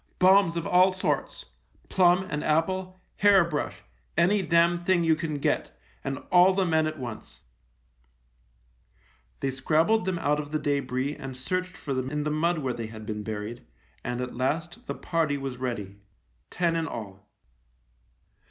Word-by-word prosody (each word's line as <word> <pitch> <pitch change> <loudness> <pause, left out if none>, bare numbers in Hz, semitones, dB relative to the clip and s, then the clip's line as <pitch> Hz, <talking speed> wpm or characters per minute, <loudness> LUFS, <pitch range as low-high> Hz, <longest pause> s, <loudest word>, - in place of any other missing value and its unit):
" - - -39
Bombs 185 -2 +5
of 170 - -2
all 180 +1 +5
sorts 185 0 -2 0.2
— - - -40
plum 180 0 +4
and 150 0 -2
apple, 185 +4 0 0.2
hair 200 -2 +6
brush, 150 -3 -4 0.3
any 195 +4 +4
damn 170 -1 +3
thing 180 -1 +3
you 165 -1 +4
can 155 -2 -3
get, 140 - -1 0.3
and 135 0 -3
all 180 +1 +6
the 190 -1 +2
men 160 -2 +2
at 155 0 -4
once! 120 -5 -8 1.0
" - - -37
They 135 - 0
scrabbled 160 +10 +2
them 190 -2 -1
out 150 -2 +1
of 145 -1 -5
the 155 - -1
debris 140 -1 -1
and 135 -3 -8
searched 185 +6 -2
for 140 - -4
them 130 0 -2
in 150 +1 -2
the 150 - -1
mud, 165 +3 +1
where 135 -5 -2
they 115 -2 -5
had 110 -1 -10
been 105 -1 -4
buried, 110 +2 -5 0.4
and 125 0 -3
at 125 - -4
last 165 - -2
the - - -3
party 160 -4 0
was 135 -2 -5
ready 105 -6 -4 0.3
— - - -42
ten 170 -2 0
in 165 -1 -1
all. 100 -6 -8
150 Hz, 175 wpm, -27 LUFS, 125-175 Hz, 1.0 s, hair